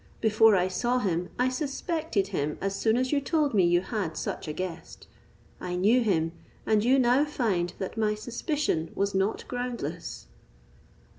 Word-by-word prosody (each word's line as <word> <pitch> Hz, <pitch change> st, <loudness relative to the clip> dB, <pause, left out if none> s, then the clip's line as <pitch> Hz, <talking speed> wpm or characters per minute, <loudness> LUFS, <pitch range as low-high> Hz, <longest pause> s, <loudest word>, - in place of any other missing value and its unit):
Before 220 Hz, -1 st, +5 dB
I 180 Hz, -1 st, +2 dB
saw 240 Hz, +7 st, 0 dB
him 180 Hz, -6 st, -1 dB
I 250 Hz, +1 st, +2 dB
suspected 285 Hz, -, -2 dB
him 150 Hz, -6 st, -2 dB
as 195 Hz, 0 st, -2 dB
soon 220 Hz, +3 st, +2 dB
as 255 Hz, 0 st, 0 dB
you 290 Hz, -1 st, +2 dB
told 295 Hz, -1 st, +1 dB
me 195 Hz, -3 st, +4 dB
you 175 Hz, 0 st, +4 dB
had 190 Hz, -5 st, -3 dB
such -, -, -4 dB
a -, -, -2 dB
guest. 180 Hz, +1 st, -6 dB, 0.5 s
I 180 Hz, 0 st, -4 dB
knew 215 Hz, +8 st, +4 dB
him, 165 Hz, -7 st, +1 dB, 0.3 s
and 215 Hz, -1 st, +3 dB
you 255 Hz, +3 st, +4 dB
now 255 Hz, +2 st, +4 dB
find 210 Hz, -, -1 dB
that 190 Hz, +4 st, -5 dB
my 215 Hz, -1 st, +1 dB
suspicion 240 Hz, -, -2 dB
was 200 Hz, 0 st, 0 dB
not 195 Hz, +3 st, 0 dB
groundless." 245 Hz, -, -5 dB
215 Hz, 165 wpm, -27 LUFS, 185-250 Hz, 0.5 s, Before